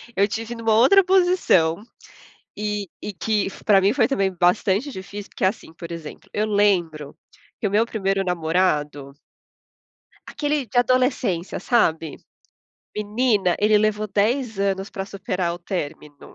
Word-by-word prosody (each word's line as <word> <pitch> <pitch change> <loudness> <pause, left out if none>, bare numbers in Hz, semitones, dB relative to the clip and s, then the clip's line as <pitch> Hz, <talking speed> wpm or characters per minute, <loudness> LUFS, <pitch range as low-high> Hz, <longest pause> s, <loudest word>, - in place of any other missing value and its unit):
eu 200 +1 +3
tive 225 +3 -5
numa 225 -1 0
outra 390 - +6
posição, 355 - +2 0.7
e 210 -2 -3
e 210 - -5
que 210 0 -1
foi - - -14
pra 200 -3 +5
mim 200 +3 +3
foi - - +3
também 195 -9 0
bastante 190 - +1
difícil, 200 +1 -8
porque - - -4
assim, 190 -4 -1
por 170 0 -10
exemplo, 165 -2 -9
eu 215 +1 0
lembro 175 -8 0 0.4
que 210 - 0
o - - -1
meu 215 +3 +3
1º 195 -4 -1
namorado 160 -5 -1 1.1
aquele 295 -2 -2
de 245 - -5
adolescência, 250 - +1
sabe, 165 - +1 0.8
menina, 210 -3 +1
ele 210 0 +4
levou 215 0 0
10 220 +2 0
anos 195 -1 -1
para 195 - -5
superar 185 -3 -3
o 175 - -9
término. 150 -5 -7
200 Hz, 145 wpm, -22 LUFS, 180-225 Hz, 1.1 s, outra